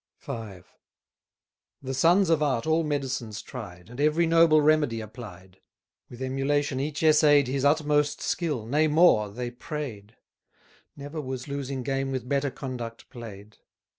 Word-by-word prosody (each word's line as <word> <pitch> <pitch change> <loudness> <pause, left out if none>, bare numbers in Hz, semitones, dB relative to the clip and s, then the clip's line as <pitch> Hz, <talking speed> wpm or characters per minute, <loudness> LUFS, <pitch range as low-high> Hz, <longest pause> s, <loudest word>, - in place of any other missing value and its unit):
V. 105 -6 -6 1.2
The 135 0 -4
sons 170 +6 +4
of 160 -2 +3
art 135 -6 0
all 160 +1 +2
medicines 135 -7 -3
tried, 90 -9 -9
And 120 +4 -7
every 155 +3 +3
noble 165 -1 +5
remedy 150 -6 +2
applied; 100 -4 -11 0.5
With 125 +2 -8
emulation 135 +1 0
each 145 +2 -3
essay'd 150 -3 +5
His 135 +1 -2
utmost 150 0 +2
skill, 150 -10 -2
nay 150 +7 +2
more, 150 -9 +4
they 120 +4 -5
pray'd: 120 -6 -7 0.8
Never 145 +2 -6
was 130 -1 -6
losing 140 -2 -4
game 135 0 -2
with 130 -2 -4
better 140 +1 0
conduct 120 -4 -7
play'd. 110 -4 -10
135 Hz, 135 wpm, -26 LUFS, 120-150 Hz, 1.2 s, noble